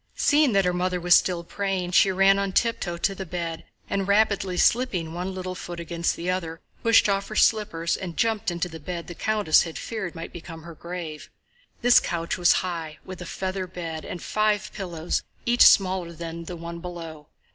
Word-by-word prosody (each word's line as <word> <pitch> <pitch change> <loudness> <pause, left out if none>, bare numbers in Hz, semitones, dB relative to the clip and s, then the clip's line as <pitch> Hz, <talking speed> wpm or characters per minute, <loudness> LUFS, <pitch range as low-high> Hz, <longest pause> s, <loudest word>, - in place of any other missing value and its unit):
Seeing 290 -4 +3
that 195 -1 +3
her 180 - +1
mother 180 0 -1
was 175 0 +4
still 175 -2 +3
praying 190 -1 -2
she 190 +2 +5
ran 195 +1 +4
on 195 -1 -2
tiptoe 195 -7 0
to 195 +3 0
the 195 - -6
bed 170 -2 -5 0.2
and, 195 -1 -1
rapidly 200 -3 +2
slipping 190 -11 +2
one 180 +2 -4
little 185 0 -4
foot 175 -1 -7
against 170 0 -1
the 170 - -6
other, 170 -3 -2 0.2
pushed 230 -1 +5
off 200 0 0
her 215 - -7
slippers 205 -8 +2
and 175 -3 -7
jumped 220 -5 +1
onto 175 +1 -2
the 165 -2 -9
bed 170 +2 -5
the 175 - -8
countess 210 -4 +3
had 165 -2 -5
feared 195 -7 -5
might 165 - -7
become 165 -1 -9
her 170 +1 -9
grave. 170 -2 -7 0.5
This 245 0 +7
couch 170 -1 -2
was 175 -1 +4
high, 165 -4 -5
with 185 -1 -8
a 180 - -6
feather 190 0 -3
bed 165 -3 -6
and 175 - -7
five 215 -1 0
pillows 175 -4 -3 0.2
each 240 +1 +2
smaller 185 -3 +5
than 165 0 -7
the 175 - -6
one 170 0 -7
below. 165 -3 -8
180 Hz, 195 wpm, -25 LUFS, 170-195 Hz, 0.5 s, This